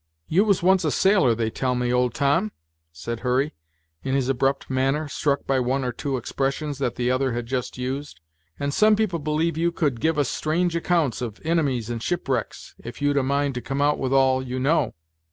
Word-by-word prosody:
"You 190 Hz, +7 st, +3 dB
was 200 Hz, -4 st, +2 dB
once 190 Hz, 0 st, +4 dB
a 155 Hz, -, +1 dB
sailor, 185 Hz, -, +3 dB
they 110 Hz, -1 st, -1 dB
tell 125 Hz, +1 st, -1 dB
me, 125 Hz, 0 st, 0 dB
old 125 Hz, -1 st, +1 dB
Tom?" 140 Hz, -6 st, +1 dB, 0.4 s
said 115 Hz, +9 st, -5 dB
Hurry, 130 Hz, +4 st, 0 dB, 0.5 s
in 135 Hz, 0 st, -1 dB
his 135 Hz, -2 st, 0 dB
abrupt 135 Hz, +1 st, 0 dB
manner, 135 Hz, +4 st, 0 dB
struck 140 Hz, 0 st, -1 dB
by 135 Hz, -1 st, +1 dB
one 130 Hz, +2 st, 0 dB
or 125 Hz, -, -1 dB
two 135 Hz, +2 st, -3 dB
expressions 140 Hz, +3 st, -2 dB
that 130 Hz, -4 st, -1 dB
the 125 Hz, 0 st, 0 dB
other 130 Hz, -1 st, +1 dB
had 120 Hz, 0 st, -3 dB
just 125 Hz, +1 st, -3 dB
used, 130 Hz, -3 st, -4 dB, 0.4 s
"and 140 Hz, 0 st, -1 dB
some 215 Hz, +4 st, +5 dB
people 210 Hz, -6 st, 0 dB
believe 155 Hz, +2 st, -1 dB
you 170 Hz, +1 st, +2 dB
could 145 Hz, -8 st, -1 dB
give 160 Hz, 0 st, +1 dB
us 145 Hz, -3 st, +2 dB
strange 170 Hz, +5 st, 0 dB
accounts 165 Hz, -7 st, +1 dB
of 115 Hz, -4 st, -5 dB
inimies 140 Hz, -9 st, 0 dB
and 115 Hz, -1 st, -4 dB
shipwrecks, 135 Hz, -7 st, -3 dB
if 120 Hz, -, -8 dB
you'd 145 Hz, 0 st, +1 dB
a 140 Hz, -, +3 dB
mind 140 Hz, +1 st, 0 dB
to 125 Hz, -, -4 dB
come 135 Hz, +2 st, -4 dB
out 145 Hz, +1 st, +2 dB
with 130 Hz, -1 st, -1 dB
all 130 Hz, -1 st, +4 dB
you 130 Hz, 0 st, -4 dB
know?" 145 Hz, +6 st, +1 dB
135 Hz, 210 wpm, -24 LUFS, 125-155 Hz, 0.5 s, some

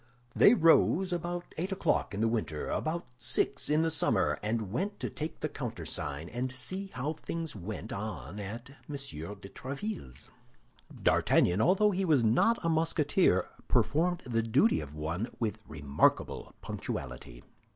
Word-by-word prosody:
They 220 Hz, -, +7 dB
rose 175 Hz, +1 st, +4 dB
about 175 Hz, +1 st, -4 dB
eight 185 Hz, +4 st, -2 dB
o'clock 185 Hz, -, 0 dB
in 100 Hz, -, -2 dB
the 115 Hz, -, +3 dB
winter, 110 Hz, -10 st, -2 dB
about 165 Hz, +2 st, -2 dB
six 120 Hz, +4 st, +1 dB
in 155 Hz, +2 st, +3 dB
summer, 160 Hz, -, +2 dB
and 110 Hz, -2 st, -2 dB
went 200 Hz, -, -2 dB
to -, -, -3 dB
take 155 Hz, 0 st, -5 dB
the -, -, 0 dB
countersign 75 Hz, +1 st, -4 dB
and 125 Hz, +6 st, -3 dB
see 185 Hz, +10 st, -2 dB
how 140 Hz, +5 st, -2 dB
things 165 Hz, -1 st, -5 dB
went 110 Hz, +4 st, -6 dB
on 100 Hz, -, -5 dB
at 115 Hz, +6 st, -7 dB, 0.2 s
M. 145 Hz, -, -4 dB
de 100 Hz, -, -7 dB
Tréville's. 135 Hz, -, -6 dB, 0.7 s
D'Artagnan, 90 Hz, +4 st, +4 dB
although 195 Hz, -, +4 dB
he 195 Hz, 0 st, 0 dB
was 150 Hz, -9 st, +3 dB
not 125 Hz, -, +4 dB
a -, -, +3 dB
Musketeer, 160 Hz, -, +2 dB, 0.2 s
performed 175 Hz, +4 st, +2 dB
the 115 Hz, -3 st, +1 dB
duty 115 Hz, -, +3 dB
of 75 Hz, 0 st, -9 dB
one 80 Hz, +8 st, -2 dB
with 110 Hz, -2 st, -1 dB
remarkable 75 Hz, -2 st, 0 dB
punctuality. -, -, -6 dB
125 Hz, 145 wpm, -31 LUFS, 100-165 Hz, 0.7 s, They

